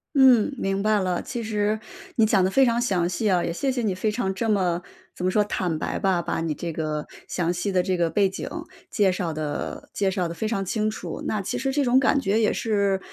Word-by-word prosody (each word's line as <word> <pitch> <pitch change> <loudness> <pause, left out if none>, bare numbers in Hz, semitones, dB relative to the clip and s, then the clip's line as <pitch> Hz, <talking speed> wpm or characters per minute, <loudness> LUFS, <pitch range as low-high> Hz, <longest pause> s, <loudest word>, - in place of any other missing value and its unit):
嗯， 265 -1 +6
明 195 -1 -1
白 215 -1 +3
了， 180 -2 -1
其 240 -3 -4
实 215 -1 0 0.4
你 225 - +5
讲 200 -3 +3
的 190 - +1
非 270 +3 +5
常 235 0 +2
详 185 -7 +1
细 205 +4 0
啊， 180 -1 +3
也 170 - -2
谢 270 +8 0
谢 250 -1 -2
你 200 -4 0
非 210 +3 0
常 200 -4 -1
这 225 +3 -2
么 180 -4 +1 0.3
怎 180 - -6
么 185 - +2
说， 210 - +3
坦 175 -6 -2
白 - - -2
吧， 185 -3 +2
把 165 - -2
你 160 -2 -1
这 165 +2 -5
个 155 -1 -3 0.2
详 175 -1 0
细 180 +3 -2
的 185 -1 +3
这 185 0 0
个 170 -1 +1
背 195 +3 +2
景， 190 - -6 0.4
介 205 -5 +3
绍 180 -2 -1
的 155 -1 -4
介 195 -2 +1
绍 185 -3 -1
的 165 - -5
非 215 +5 -3
常 195 -4 -1
清 215 +2 0
楚。 - - -6
那 210 -2 -1
其 190 - -3
实 270 +1 -1
这 280 -1 +1
种 245 +1 +4
感 275 +2 +4
觉 215 -5 +1
也 215 - +3
是 200 -3 +1
195 Hz, 265 characters per minute, -24 LUFS, 180-220 Hz, 0.4 s, 嗯